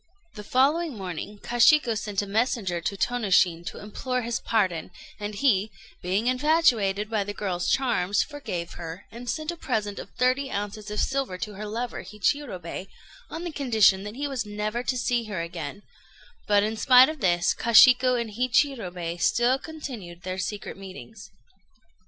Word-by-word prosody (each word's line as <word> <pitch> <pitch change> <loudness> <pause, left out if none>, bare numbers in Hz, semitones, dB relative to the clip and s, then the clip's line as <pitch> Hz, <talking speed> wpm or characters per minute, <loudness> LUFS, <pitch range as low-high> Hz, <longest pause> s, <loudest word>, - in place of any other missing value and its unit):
The 210 - -9
following 280 +5 +2
morning 190 +2 -6
Kashiku 240 +1 +4
sent 210 -2 -2
a - - -4
messenger 200 -4 0
to 200 +4 -3
Tônoshin 185 -8 +2
to - - -6
implore 250 +5 -3
his 235 0 -2
pardon; 185 -8 0 0.3
and 210 0 -5
he, 210 -4 +2 0.3
being 190 +5 0
infatuated 250 -7 +2
by 215 -2 0
the 205 +1 -6
girl's 185 -4 -2
charms, 205 -7 +2
forgave 185 - -6
her, 165 +1 -7
and 240 +2 -8
sent 310 +5 -2
a - - -7
present 215 -10 -2
of - - -8
thirty 255 +2 +1
ounces 205 0 -4
of 210 - -3
silver 265 -9 -1
to 210 +3 -5
her 210 +2 -6
lover, 235 +3 -4
Hichirobei, 200 - -3 0.4
on 330 - -6
the 345 - -4
condition 220 -9 +3
that 210 +2 -7
he 285 +2 -2
was 270 -4 -2
never 210 +2 -3
to 255 +1 -1
see 240 -1 0
her 205 -4 -4
again; 170 +2 -6 0.6
but, 205 -1 +4
in 220 +1 -2
spite 255 +2 +7
of 310 -1 -5
this, 175 -4 +2
Kashiku 250 +2 +6
and 230 -2 -4
Hichirobei 215 - 0
still 245 +2 +3
continued 240 - -8
their 185 0 -4
secret 200 +2 -4
meetings. 195 +1 -11
215 Hz, 165 wpm, -26 LUFS, 195-255 Hz, 0.6 s, spite